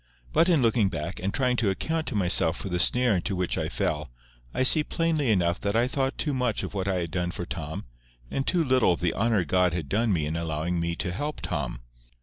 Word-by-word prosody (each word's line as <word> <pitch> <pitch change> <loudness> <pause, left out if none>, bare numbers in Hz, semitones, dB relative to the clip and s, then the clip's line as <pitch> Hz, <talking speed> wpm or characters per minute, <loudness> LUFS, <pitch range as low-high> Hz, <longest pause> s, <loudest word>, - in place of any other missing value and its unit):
But, 170 - +4
in 160 -7 +3
looking 115 -3 +3
back, 85 +1 -5
and 95 +2 -2
trying 125 0 +1
to 110 -4 +1
account 160 +11 -2
to - - -3
myself 90 -4 +3
for 100 - -5
the 90 -1 -1
snare 125 +3 +4
into 95 +3 -2
which 90 -1 -1
I - - -2
fell, 75 -2 -2 0.4
I 130 - 0
see 150 +4 +6
plainly 160 -5 0
enough 90 -4 +1
that 100 +1 -1
I 120 +2 +3
thought 135 +1 -1
too 150 - -1
much 125 -4 0
of - - -5
what 95 -1 -2
I 95 - +1
had 85 -2 -2
done 90 -1 -1
for - - -5
Tom, - - -6 0.5
and 135 - -2
too 175 -2 +2
little 130 - +3
of - - -5
the 85 -1 0
honour 110 -4 +1
God 90 +2 +2
had 85 -5 -3
done 110 +2 +1
me 80 -5 +1
in 75 +2 -3
allowing 85 +1 -2
me 85 0 -1
to 90 0 -2
help 145 +11 -4
Tom. 60 -7 -3
95 Hz, 240 wpm, -26 LUFS, 85-125 Hz, 0.5 s, see